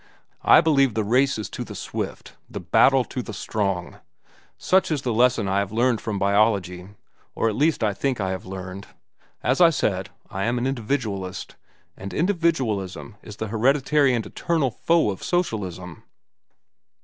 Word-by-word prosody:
I - - +7
believe 140 -7 +3
the 110 - +1
race 130 +5 +2
is 110 - -4
to - - -5
the - - -9
swift, - - -6 0.2
the - - -6
battle 135 -1 +4
to 130 - -5
the 110 - -8
strong. 95 -3 -3 0.6
Such 185 - +2
is 150 -4 -1
the 120 - -1
lesson 120 -2 +3
I 95 +1 +1
have 100 0 -2
learned 120 +1 +1
from 105 -2 -3
biology, 100 -3 +1 0.5
or 115 - +1
at 105 - -3
least 155 +5 +1
think 115 +5 -1
I 95 -2 -1
have 95 0 -4
learned. 95 +1 -8 0.6
As 130 +7 +1
I 170 - +8
said, 95 - -1 0.2
I 95 +1 -3
am 120 +1 0
an 120 - -1
individualist, 110 -7 -3 0.4
and 100 0 -8
individualism 130 - -1
is 105 - -10
the 110 0 -5
hereditary 135 +4 +2
and 115 - -2
eternal 160 -7 -1
foe 165 -1 +2
of 95 - -8
socialism." 95 - -3
110 Hz, 160 wpm, -23 LUFS, 100-135 Hz, 0.6 s, I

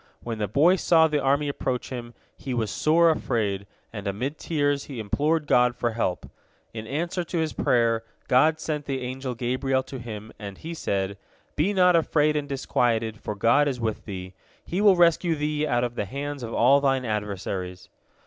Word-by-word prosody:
When 115 -2 -4
the 105 - 0
boy 155 - +4
saw 160 -2 +4
the 150 -2 0
army 140 +2 +2
approach 130 -2 -3
him, 120 -2 -7 0.2
he 130 -2 -5
was 110 -4 -1
sore 165 +2 +4
afraid, 105 -9 -1 0.3
and 100 -2 -6
amid 125 +10 -3
tears 145 -3 0
he 135 -5 -7
implored 150 +9 0
God 125 -3 +3
for 120 0 -1
help. 95 -6 -2 0.5
In 110 -1 -7
answer 170 +6 -2
to 170 - -4
his 160 -2 -1
prayer, 115 -2 +2 0.2
God 155 +5 +4
sent 150 -2 -3
the 135 -2 -3
angel 130 0 -4
Gabriel 130 +3 0
to 130 0 -8
him, 110 -2 -8
and 100 -2 -7
he 165 +1 -7
said: 100 -9 -2 0.4
"Be 160 +7 +1
not 180 -3 +4
afraid 155 -2 +2
and 145 -1 -2
disquieted, 115 -5 0
for 105 - -4
God 115 +8 +3
is 130 -3 -2
with 110 -2 -3
thee. 95 -2 -7 0.3
He 185 +4 -2
will 205 -2 +6
rescue 170 -1 +3
thee 150 0 -1
out 120 -3 +1
of 120 -1 -2
the 105 - -3
hands 140 +6 -5
of 115 -1 -5
all 135 +5 +4
thine 135 -2 +1
adversaries." 100 -4 -4
130 Hz, 185 wpm, -25 LUFS, 110-150 Hz, 0.5 s, will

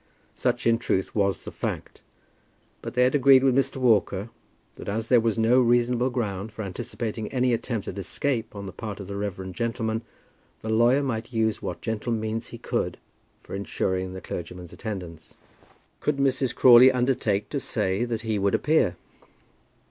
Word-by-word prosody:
Such - - -1
in 115 0 +3
truth 95 -5 -1
was 100 -3 0
the - - -7
fact, - - -5 0.8
but - - -7
they 125 - +4
had 125 - +3
agreed 135 -2 +6
with 130 -2 +4
Mr. 135 - +1
Walker, 110 -4 +2 0.4
that - - -8
as 110 +2 -2
there 125 - +6
was 115 -2 0
no 115 +3 +4
reasonable 120 +1 +2
ground 110 -4 -3
for 110 +1 -6
anticipating 110 +2 -4
any 125 -2 +2
attempt 115 -2 -2
at 100 - -5
escape 115 - -2
on 100 -1 -6
the 95 - -6
part 105 -1 -7
of 100 - -6
the 100 +1 -6
reverend 95 -2 -4
gentleman, 115 -1 -2 0.6
the 110 - -5
lawyer 120 +5 +4
might 115 -2 -3
use 110 -2 0
what 85 -2 -5
gentle 110 +2 -3
means 110 +1 -3
he 120 - -9
could - - -2 0.5
for - - -11
ensuring 95 -1 -2
the 95 - -7
clergyman's 90 0 -7
attendance. 90 -5 -7 0.6
Could 150 -2 0
Mrs. 135 -2 +1
Crawley 125 +1 +8
undertake 125 -5 0
to - - -2
say 95 +4 0
that 115 -2 -2
he 110 -2 -1
would 100 0 +2
appear? 150 - +2
110 Hz, 170 wpm, -26 LUFS, 100-125 Hz, 0.8 s, Crawley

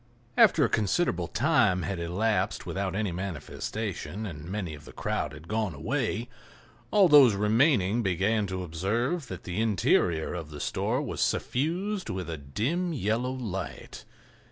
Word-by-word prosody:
After - - +6
a - - +3
considerable 100 - +1
time 115 - +2
had 95 -3 -3
elapsed 100 +6 0
without 95 -1 -2
any 105 -2 -1
manifestation, 95 +1 -4
and 80 -6 -7
many 95 -5 -3
of 75 0 -11
the - - -11
crowd - - -2
had 75 +2 -12
gone 110 -5 -1
away, 115 - -2 0.6
all 200 -3 +5
those 140 -8 +7
remaining 110 - +3
began 100 +2 +1
to 95 0 -4
observe 115 - -1
that 95 -4 -7
the 90 +4 -2
interior 90 -6 +2
of 80 -4 -5
the 75 -1 -8
store - - -1
was - - -4
suffused 180 +9 -1
with 90 -3 -4
a 80 - -4
dim, 135 - -1
yellow 120 -1 0
light. 100 -9 -6
100 Hz, 150 wpm, -28 LUFS, 90-120 Hz, 0.6 s, those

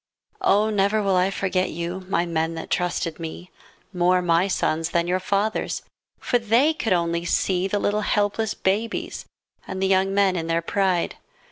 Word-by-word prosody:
Oh, 215 - +3
never 205 +1 +2
will 195 -1 +2
I 180 +1 +3
forget 190 -1 -1
you, 175 +3 -5
My 175 -3 +1
men 165 -1 -1
that 165 - -7
trusted 175 -2 -1
me. 165 +2 -7 0.4
More 180 0 +2
my 170 +2 +3
sons 165 -4 0
than 170 0 +1
your 180 +1 0
fathers'. 200 +3 -1 0.3
For 245 - 0
they 235 +7 +3
could 230 -8 -3
only 170 -1 +1
see 180 +1 +1
The 205 - -1
little 205 +1 0
helpless 210 +1 0
babies 210 +4 -2 0.4
And 190 - -5
the 190 - +1
young 190 0 +2
men 195 -1 +3
in 165 -2 -3
their 165 0 0
pride. 185 -1 0
185 Hz, 170 wpm, -23 LUFS, 170-200 Hz, 0.4 s, Oh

